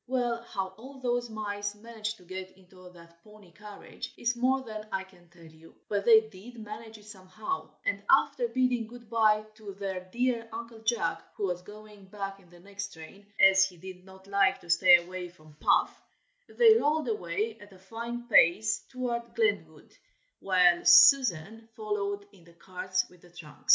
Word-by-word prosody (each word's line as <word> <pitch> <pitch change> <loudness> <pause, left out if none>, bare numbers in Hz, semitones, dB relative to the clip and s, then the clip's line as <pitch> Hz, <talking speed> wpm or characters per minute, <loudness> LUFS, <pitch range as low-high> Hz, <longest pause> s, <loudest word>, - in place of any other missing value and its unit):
Well 240 -2 -1
how 190 -2 -2
all 265 +3 -11
those 245 -1 -1
mice 205 -1 -4
managed 220 0 -6
to 180 - -19
get 185 +1 -8
into 185 -1 -16
that 170 0 -18
pony 210 -4 -17
carriage 210 +1 -10
is 240 +1 -1
more 260 +2 +1
than 215 -3 -8
I 190 0 -2
can 180 -2 -21
tell 175 -1 -19
you: 160 +1 -17
but 200 -1 -1
they 225 -2 +8
did 220 +3 -13
manage 220 +1 -9
it 210 - -18
somehow, 210 - -6 0.2
and - - -1
after 485 - +3
bidding 250 - 0
good 235 -1 -14
bye 215 -2 +3
to 210 -3 -10
their 195 -2 -4
dear 240 -1 -1
Uncle 230 0 -8
Jack, 225 +1 -1
who 205 - -2
was 180 -1 -3
going 210 0 -14
back 195 0 -7
in 180 -3 -22
the 175 0 -17
next 200 +2 -7
train, 180 +6 -13
as 190 0 +7
he 190 -2 -3
did 185 +1 -11
not 190 0 -16
like 200 0 +2
to 170 - -5
stay 180 0 +7
away 180 0 -7
from 155 -3 -19
Puff, - - +2 0.5
they 455 -2 +6
rolled 305 -1 0
away 215 +1 -3
at 205 0 -14
a 190 - -16
fine 235 +5 -7
pace 220 +2 +4
toward 240 -2 -4
Glenwood, 445 -3 -2 0.4
while 180 -2 +3
Susan 225 - +5
followed 205 -2 -3
in 190 -4 -20
the 170 0 -19
carts 185 +1 -3
with 180 -1 -21
the 175 - -18
trunks. 160 -4 -14
205 Hz, 180 wpm, -29 LUFS, 185-230 Hz, 0.5 s, they